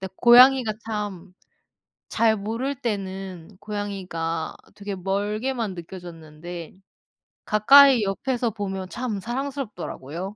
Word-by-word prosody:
근데 190 -1 -7
고양이가, 245 -1 +7
참 205 -4 -5 0.8
잘 220 -1 +2
모를 230 +7 -3
때는 195 -5 -5
고양이가 190 -6 -4 0.2
되게 200 -1 -5
멀게만 210 +4 -2
느껴졌는데 170 -1 -9 0.7
가까이 260 +3 +7
옆에서 240 +4 -1
보면 195 -3 -5
참 230 -2 -4
사랑스럽더라고요. 210 - -5
205 Hz, 250 characters per minute, -24 LUFS, 185-230 Hz, 0.8 s, 고양이가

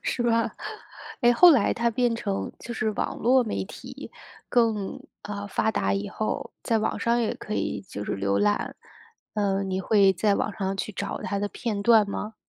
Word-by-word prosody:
是 240 - -1
吧。 230 -1 +1 0.7
诶， 240 0 +5
后 350 +8 +8
来 255 -10 +4
它 235 0 +1
变 240 0 +1
成 200 -4 -3
就 240 - -7
是 215 0 0
网 210 - -3
络 255 +2 +4
媒 215 - -2
体， 190 - -10 0.4
更 225 -5 +1 0.2
呃， 205 0 -5
发 220 +3 +1
达 95 - 0
以 100 +1 -2
后， 215 - -3
在 225 - +1
网 215 - -1
上 235 +1 +1
也 225 - 0
可 210 - -6
以 - - -2
就 105 0 -5
是 - - -2
浏 100 0 0
览。 205 0 0 0.6
嗯， 195 -2 0
你 190 0 -1
会 195 -1 +4
在 200 +3 +2
网 210 - -1
上 195 -1 -2
去 210 +2 -4
找 - - -4
它 200 - -2
的 205 +1 -1
片 210 -3 -3
段 220 -2 +5
吗？ 210 +2 -4
210 Hz, 205 characters per minute, -26 LUFS, 195-230 Hz, 0.7 s, 后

